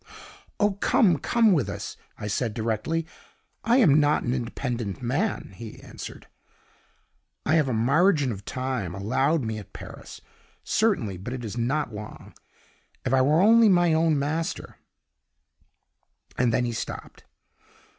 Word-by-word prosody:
'Oh, 205 0 +3
come, 175 -9 +4
come 225 -4 +3
with 145 -8 +1
us!' - - -6 0.2
I - - -6
said 105 +1 -2
directly. 115 +9 -1 0.6
'I 235 +3 +3
am 155 - +6
not 145 0 +2
an 120 - -1
independent 120 -4 -3
man,' 145 - -1
he 110 +3 -10
answered; - - -10 1.2
'I 150 - +2
have 155 -5 +3
a - - 0
margin 145 - +3
of 100 -2 -7
time 125 -8 -3
allowed 135 +10 +1
me 110 -1 -3
at 105 - -13
Paris, - - -10 0.4
certainly, 185 - +1
but 105 +8 -6
it 125 -2 -5
is 105 - -5
not 125 +2 -1
long 105 0 -9 0.7
if 130 - 0
I 130 - +5
were 150 +6 +4
only 225 +2 +6
my 175 -3 +4
own 160 -1 +3
master 155 +4 -3 0.8
' - - -37
and 125 -1 +3
then 125 +2 +1
he 120 - -2
stopped. 115 - -7
130 Hz, 145 wpm, -26 LUFS, 115-165 Hz, 1.2 s, am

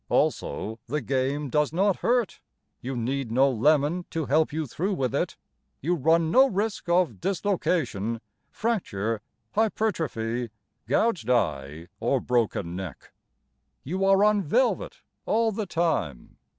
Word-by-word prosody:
Also, 110 +2 0
the 150 +5 -1
game 135 +3 -1
does 150 +2 +1
not 190 +3 +2
hurt. 240 -5 0 0.4
You 130 +2 -4
need 130 +1 -2
no 130 +4 +4
lemon 150 +7 +2
to 160 -2 -2
help 155 +3 +2
you 155 +1 -2
through 185 - -2
with 130 -8 -1
it, - - -1 0.4
You 170 +6 0
run 165 +1 +2
no 265 +5 +6
risk 205 -2 -2
of 170 - +2
dislocation, 165 - 0 0.3
fracture, 115 - -2 0.3
hypertrophy, 155 - -1 0.4
gouged 215 - +1
eye, 80 - 0
or 120 +4 +1
broken 110 -8 0
neck, 90 -7 -7 0.7
You 185 +7 -2
are 195 +1 +5
on 210 -1 +4
velvet 250 - 0 0.2
all 225 0 +2
the 210 0 -3
time. 160 - -1
150 Hz, 130 wpm, -26 LUFS, 115-195 Hz, 0.7 s, no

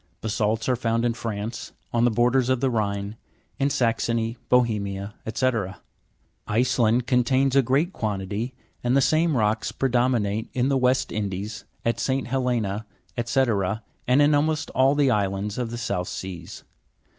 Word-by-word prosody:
Basa'lts 110 0 0
are 130 - +3
found 115 -1 0
in 120 - +2
France, 115 0 -5 0.2
on 120 0 +3
the - - +5
borders 120 +3 +2
of 130 -1 +2
the 130 0 +1
Rhine, 100 -1 -2 0.4
in 140 +1 +2
Saxony, 115 -2 0
Bohemia, 105 -5 +1 0.2
&c. 130 +3 +2 1.0
Iceland 120 +1 +2
contains 130 +1 +2
a 135 - +7
great 140 +9 +1
quantity, 105 +3 -3 0.3
and 125 +2 +3
the - - +6
same 155 +2 +2
rocks 110 0 +1
predominate 120 -4 0
in 130 +1 +1
the 140 - +2
West 125 0 +2
Indies, 100 0 -4 0.2
at 115 - +1
St. 135 0 0
Helena, 120 -5 -1 0.4
&c., 120 +3 +2 0.7
and 125 +3 +5
in 150 +1 +4
almost 155 +1 +1
all 135 +2 +3
the 145 -2 +3
islands 100 0 -1
of 120 -2 -2
the 120 - -5
South 90 -6 -2
Seas. 90 -3 -7
120 Hz, 150 wpm, -25 LUFS, 105-130 Hz, 1.0 s, a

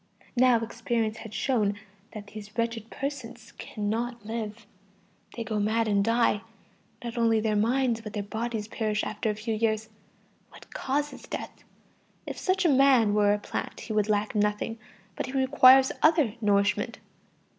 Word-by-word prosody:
Now, 250 -1 +5
experience 230 -1 -2
has 225 -1 -9
shown 215 -3 +1 0.4
that 210 -2 -7
these 215 +1 -10
wretched 230 -1 -2
persons 240 -5 -6
cannot 225 +2 -3
live. 220 -1 -5 0.7
They 230 - -2
go 215 -1 -2
mad 220 +2 +1
and 200 -1 +2
die. 230 -1 +2 0.6
Not 235 0 -4
only 225 -1 +3
their 215 -1 0
minds 235 +2 +1
but 215 -2 -8
their 205 - -2
bodies 220 +1 -4
perish 215 -2 -1
after 215 +1 -2
a 210 - -1
few 220 +2 -3
years. 220 0 0 0.6
What - - -15
causes 290 +2 -2
death? - - -7 0.6
If - - -6
such 370 0 +1
a - - +7
man 265 -7 +5
were 205 -1 +4
a - - -2
plant, 205 - -5
he 220 - -5
would 210 0 +1
lack 210 0 +1
nothing, 210 +2 0 0.4
but - - -3
he 260 - -7
requires 265 0 +6
other 310 -8 +4
nourishment. 205 -1 +1
225 Hz, 155 wpm, -27 LUFS, 210-240 Hz, 0.7 s, a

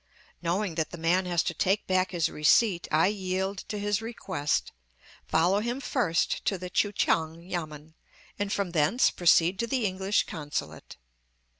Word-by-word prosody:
Knowing 180 +2 -1
that 160 -1 -1
the 175 - -8
man 175 +3 +1
has 175 -2 +1
to - - -2
take 195 +2 0
back 185 0 +1
his 170 -3 0
receipt 175 +4 +2
I 155 +1 +4
yield 190 -1 -2
to 210 - -4
his 205 0 -1
request, 190 -10 -2 0.6
follow 175 +5 +2
him 240 +4 -2
first 220 - 0
to 195 - +1
the 180 0 -7
Kui 205 - +1
kiang 165 -4 0
yamen, 155 -3 -6 0.5
and 205 -1 -2
from 200 -3 -1
thence 170 - +3
proceed 175 +1 +3
to 235 - 0
the 250 -2 0
English 190 +1 +1
consulate. 150 -3 -6
185 Hz, 160 wpm, -28 LUFS, 165-205 Hz, 0.6 s, I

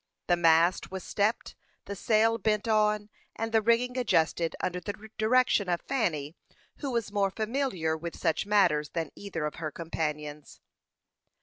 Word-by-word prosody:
The 175 - +3
mast 170 +1 +3
was 190 -1 -6
stepped, 210 +3 -1 0.3
the 200 - -5
sail 225 +3 +2
bent 210 +2 0
on, 210 -1 +2 0.2
and 225 0 -3
the 225 -1 +4
rigging 245 +3 +2
adjusted 165 -7 +1
under 180 0 -2
the 190 +4 -5 0.3
direction 220 -3 +3
of 175 -1 +1
Fanny, 165 - -2 0.4
who 285 - -4
was 235 -5 -2
more 200 -1 +1
familiar 215 - -1
with 165 +1 -6
such 165 +2 0
matters 170 -8 +3
than 165 -1 -3
either 180 -6 -4
of 150 - -4
her 160 -1 -3
companions. 150 -2 -5
195 Hz, 150 wpm, -29 LUFS, 165-220 Hz, 0.4 s, the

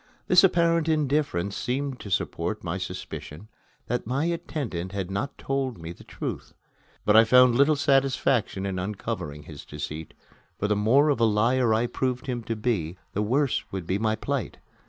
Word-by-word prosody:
This 180 +1 +6
apparent 170 -3 +3
indifference 145 - 0
seemed 135 +1 -2
to 100 - -8
support 95 - -2
my - - -3
suspicion 85 +9 -7 0.4
that 120 -2 -2
my 135 +6 0
attendant 135 - -3
had 95 -2 -3
not 120 +9 -3
told 135 -3 -2
me 80 0 -7
the 85 - -13
truth; - - -6 0.5
but 105 - +4
I 110 - +9
found 125 +1 +6
little 140 +5 +4
satisfaction 135 -7 +1
in 95 -2 -2
uncovering 90 -6 -4
his 75 -1 -10
deceit, 75 +1 -7 0.4
for 105 - -1
the 105 - +2
more 125 +9 +4
of 140 - +1
a 115 - +4
liar 115 +3 +2
I 110 +2 +2
proved 125 +2 -2
him 125 -3 -3
to 115 - -2
be, 105 -7 -1 0.2
the 105 - 0
worse 130 +6 +1
would 95 -3 -4
be 95 +3 -1
my 110 0 +1
plight. 135 +1 -3
115 Hz, 175 wpm, -26 LUFS, 100-135 Hz, 0.5 s, I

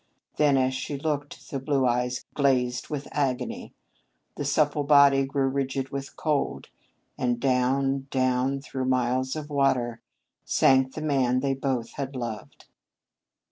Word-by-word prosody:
Then 145 -2 +4
as 130 0 +2
she 140 +2 -4
looked 145 0 -4
the 135 - -2
blue 135 0 +1
eyes 125 0 0
glazed 125 -3 +1
with 145 -2 -4
agony, 135 -4 -2 0.6
the - - -4
supple 145 +1 +1
body 140 -1 +5
grew 135 0 0
rigid 135 0 -2
with 135 0 -6
cold, 150 -4 -1 0.5
and 120 -1 0
down, 135 +1 +1
down, 130 +1 +1
through 130 -2 -4
miles 130 +1 0
of 150 -1 -6
water, 125 -5 +1 0.4
sank 130 0 +3
the 155 - -4
man 130 -4 +1
they 135 0 +1
both 130 -3 -2
had 140 -1 -4
loved. 115 -5 -6
135 Hz, 140 wpm, -26 LUFS, 130-140 Hz, 0.6 s, body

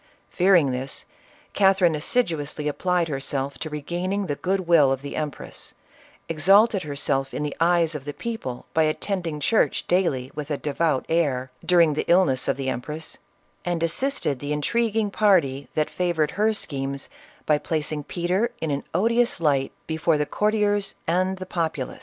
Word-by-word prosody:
Fearing 175 -7 +4
this, 130 +2 -3 0.5
Catherine 190 -4 +4
assiduously 150 - -1
applied 175 +3 0
herself 135 -1 -3
to 155 - -4
regaining 175 +7 -2
the 145 -5 -2
good 190 +5 -1
will 165 -6 +5
of 135 0 -2
the 140 - -6
empress, 150 -2 -5 0.5
exalted 195 +6 +4
herself 140 -2 -1
in - - -2
the 150 - -3
eyes 170 -1 +3
of 145 -3 -6
the 145 - -4
people 220 - -5
by 160 - +3
attending 165 0 -1
church 220 +10 +2
daily 145 -8 +1
with 150 -1 -6
a 145 - -1
devout 150 -1 0
air, 135 -6 0
during 170 -4 +4
the 145 - -2
illness 170 -8 +3
of - - +1
the 135 -1 -3
empress, 150 +5 -4 0.4
and 175 -2 -1
as 165 0 +1
sisted 270 - -1
the 145 +2 -4
intriguing 220 +6 0
party 155 -11 +2
that 155 -1 +1
favored 170 -4 0
her 210 +4 +2
schemes 140 -8 -4 0.4
by 150 -1 +3
placing 155 -1 -2
Peter 180 +8 0
in 160 - -2
an 140 - -2
odious 230 +3 +2
light 140 -4 +1
before 160 0 +1
the 150 - 0
courtiers 205 +1 0
and 185 +3 +1
the 185 - -6
populace. 165 -7 -3
160 Hz, 160 wpm, -24 LUFS, 145-185 Hz, 0.5 s, will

